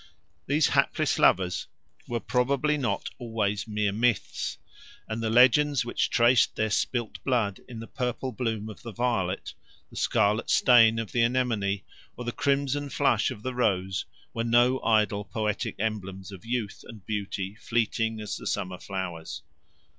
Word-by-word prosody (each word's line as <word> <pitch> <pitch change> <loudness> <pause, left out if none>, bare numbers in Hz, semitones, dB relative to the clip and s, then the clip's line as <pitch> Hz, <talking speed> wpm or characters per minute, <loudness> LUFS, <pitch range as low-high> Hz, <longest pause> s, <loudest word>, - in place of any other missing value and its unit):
These 145 +3 +3
hapless - - +1
lovers 90 -1 +3 0.4
were 120 -1 -2
probably 135 +5 +1
not 135 -5 -2
always 110 -4 -2
mere 105 -1 0
myths, 115 +1 0 0.5
and 110 +1 -3
the 110 - 0
legends 130 +3 +5
which 120 - 0
traced 120 0 +4
their 110 -1 0
spilt 120 +2 -1
blood 115 -7 0
in 120 -3 -8
the 115 - -7
purple 125 +2 -3
bloom 110 -2 -3
of 110 - -10
the 115 - -7
violet, 105 -6 -1 0.4
the - - -14
scarlet 105 +3 +1
stain 115 -3 +6
of 115 -2 -3
the 120 - +1
anemone, 115 -5 +1 0.3
or 125 - -6
the 120 - -1
crimson 140 +1 0
flush 130 -6 +2
of 110 -5 -8
the 130 - -3
rose 95 -6 0 0.3
were 115 - -1
no 120 +2 +3
idle 105 -2 +2
poetic 105 0 -2
emblems 95 -3 -4
of 95 0 -11
youth 115 -4 -3
and 110 -5 -12
beauty 100 -2 -3
fleeting 115 0 -1
as 105 - -4
the - - -7
summer 90 -2 -2
flowers. 85 -7 -5
115 Hz, 155 wpm, -27 LUFS, 100-125 Hz, 0.5 s, stain